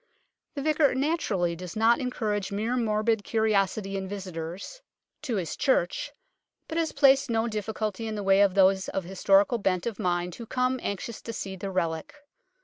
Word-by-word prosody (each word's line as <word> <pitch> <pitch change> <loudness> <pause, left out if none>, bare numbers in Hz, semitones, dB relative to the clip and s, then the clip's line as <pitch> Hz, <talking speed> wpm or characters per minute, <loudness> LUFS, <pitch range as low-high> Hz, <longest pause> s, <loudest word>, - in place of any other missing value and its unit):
The 280 - -3
Vicar 305 -3 +3
naturally 240 - 0
does 180 0 -8
not 225 +2 +4
en 255 -2 -1
courage 210 -5 -2
mere 220 +5 -1
morbid 220 -2 +1
curiosity 200 -3 0
in 190 -1 -3
visitors 185 - -6 0.4
to 265 -6 -2
his 180 -6 -2
16 - - -7
UNKNOWN 270 - +5
LONDON 175 - +1
church, - - -5 0.6
but 320 - -4
has 325 -1 0
placed 275 -2 +4
no 225 0 +1
difficulty 215 0 -3
in 220 - -3
the 205 - -4
way 195 0 +5
of 200 -2 +3
those 190 -1 +4
of 195 - -2
historical 195 +5 +3
bent 185 -3 0
of 230 -4 -4
mind 175 -1 -1
who 230 +5 -9
come, 255 +1 0
anxious 200 +3 -4
to 230 - -6
see 195 -3 -5
the 195 +1 -5
relic. 170 - -2
210 Hz, 190 wpm, -27 LUFS, 190-235 Hz, 0.6 s, UNKNOWN